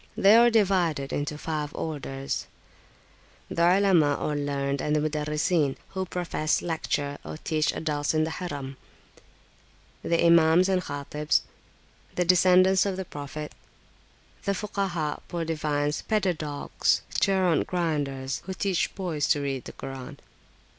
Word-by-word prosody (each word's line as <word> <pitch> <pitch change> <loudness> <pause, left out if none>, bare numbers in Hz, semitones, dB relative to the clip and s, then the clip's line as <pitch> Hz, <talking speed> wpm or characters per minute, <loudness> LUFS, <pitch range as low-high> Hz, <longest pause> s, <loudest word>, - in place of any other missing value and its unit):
They 200 +3 +6
are 235 +1 +7
divided 180 -10 +1
into 145 +1 -2
five 150 -2 -4
orders: 135 -3 -4 1.0
The 170 - -2
Olema, 175 -4 +4
or 150 - -1
learned, 140 -1 -1
and 150 - 0
the - - +3
Mudarrisin, 150 0 0
who 190 -1 -4
profess, 170 -3 -1
lecture, 145 -4 -2
or - - -7
teach 155 0 0
adults 150 -1 -1
in 155 - +3
the 160 - -2
Harim. 145 -6 -5 1.2
The 170 0 +1
Imams 170 +2 +5
and 185 -1 +2
Khatibs. 150 0 -1 0.7
The 180 - +1
descendants 185 +2 +5
of 190 -2 -2
the 190 - -4
Prophet. 150 0 -7 0.9
The 200 - +1
Fukaha, 190 -6 -2
poor 170 -1 -3
divines, 150 -2 -1
pedadogues, 170 -9 0 0.2
gerund 185 -5 +2
grinders, 145 -7 -2
who 190 - -4
teach 190 -2 -1
boys 170 -7 -1
to 150 - +3
read 135 -2 -3
the - - -7
Koran. 135 -1 -8
155 Hz, 130 wpm, -26 LUFS, 145-180 Hz, 1.2 s, are